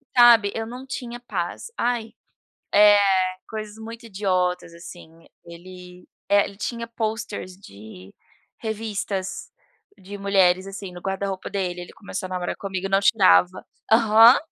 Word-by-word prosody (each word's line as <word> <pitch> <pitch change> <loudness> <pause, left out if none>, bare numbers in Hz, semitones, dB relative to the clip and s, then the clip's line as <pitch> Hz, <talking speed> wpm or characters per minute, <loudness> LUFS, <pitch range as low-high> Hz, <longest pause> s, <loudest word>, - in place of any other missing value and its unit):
sabe. 235 -4 +7
Eu 225 0 -3
não 250 +3 -9
tinha 240 -2 -6
paz, 200 - -5
ai, 235 -2 -1 1.1
eh, - - -2 0.2
coisas 215 -1 -7
muito 230 +1 -9
idiotas, 185 -4 -1
assim. 165 -1 -13 0.2
Ele, 180 +1 -13 0.2
eh, 200 0 +4
ele 195 - -9
tinha 235 +2 -4
pôsteres 220 -4 -5
de 100 - -14 0.4
revistas 205 -3 -4 0.5
de 200 +2 -9
mulheres, 190 -2 +2
assim, 195 -1 -8
no 175 - -10
guarda-roupa 195 0 -4
dele, 180 -3 -3
ele 175 - -10
começou 205 -3 -6
a - - -12
namorar 180 -1 -3
comigo, 195 -1 -4
não 195 0 +3
tirava 190 -3 +4 0.3
aham. 225 +2 +7
195 Hz, 130 wpm, -23 LUFS, 180-220 Hz, 1.1 s, sabe